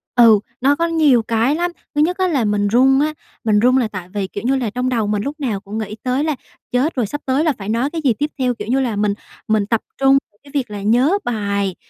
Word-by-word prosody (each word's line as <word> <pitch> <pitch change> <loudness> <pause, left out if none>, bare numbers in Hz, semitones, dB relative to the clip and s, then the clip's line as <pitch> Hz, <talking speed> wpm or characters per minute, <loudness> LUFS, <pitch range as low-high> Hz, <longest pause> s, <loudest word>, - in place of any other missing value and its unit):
Ừ, 230 -4 +7 0.2
nó 280 +2 +4
có 335 +2 0
nhiều 300 -8 +4
cái 230 +6 +1
lắm. 350 +1 -1 0.2
Thứ 295 - +3
nhất 360 +4 +1
á 375 -1 +2
là 275 -10 +1
mình 205 0 +1
run 265 +5 +4
á, 305 +1 +1 0.3
mình 210 -2 +3
run 250 +3 +4
là 240 -4 +2
tại 185 -4 -8
vì, 200 -2 -2
kiểu 200 - -7
như 265 +2 +2
là, 245 -5 -1
trong 250 +3 -2
đầu 225 -4 0
mình 210 0 -1
lúc 295 +3 -5
nào 225 -8 -2
cũng 205 +2 -7
nghĩ 215 -1 -4
tới 255 +3 0
là 310 -2 0 0.4
"Chết 265 +6 +1
rồi, 245 -4 +1
sắp 290 +5 -5
tới 270 +4 +1
là 310 -4 +2
phải 200 0 -6
nói 240 +5 0
cái 325 0 -4
gì 255 -4 +3
tiếp 295 +8 -2
theo?" 250 -1 +1
Kiểu - - -7
như 260 +3 +1
là, 240 -5 -1
mình 205 0 +1 0.3
mình 215 -2 +2
tập 225 +1 0 0.2
trung 270 0 +5 0.3
cái 280 - -16
việc 265 -6 -1
là 205 -1 -5
nhớ 250 - +3
bài, 200 -5 -1
245 Hz, 265 wpm, -19 LUFS, 210-280 Hz, 0.4 s, Ừ